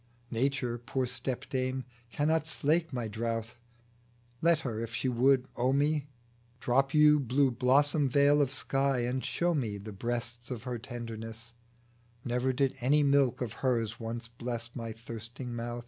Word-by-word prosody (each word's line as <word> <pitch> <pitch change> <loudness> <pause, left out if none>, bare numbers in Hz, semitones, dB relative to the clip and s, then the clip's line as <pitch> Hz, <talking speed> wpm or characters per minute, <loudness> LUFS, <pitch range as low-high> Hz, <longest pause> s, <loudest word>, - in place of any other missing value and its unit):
Nature, 125 -1 0
poor 130 +2 -1
stepdame, 130 +1 -2 0.3
cannot 155 +5 +1
slake 160 +2 +1
my 120 -3 -2
drouth; 115 +2 -3 0.8
Let 165 -1 +4
her, 115 -6 -3
if 115 0 -5
she 120 +3 -1
would 130 +1 +3
owe 125 +2 +2
me, 145 +1 +1 0.5
Drop 135 +2 +2
yon 150 0 +7
blue 130 +2 +3
bosom 140 +4 +3
veil 145 +2 +5
of 135 -2 +1
sky, 135 -2 0
and 125 +2 -1
show 175 0 0
me 115 -9 -1
The 105 +2 -8
breasts 120 +2 -4
o' 125 - -2
her 120 +1 -5
tenderness: 115 -1 -7 0.7
Never 125 +1 +1
did 135 +1 +1
any 145 +4 +4
milk 140 -4 +3
of 120 -4 -2
hers 115 -4 0
once 115 0 -5
bless 115 0 -5
My 115 -2 -4
thirsting 115 +2 -7
mouth. 120 0 -4
125 Hz, 150 wpm, -30 LUFS, 115-140 Hz, 0.8 s, yon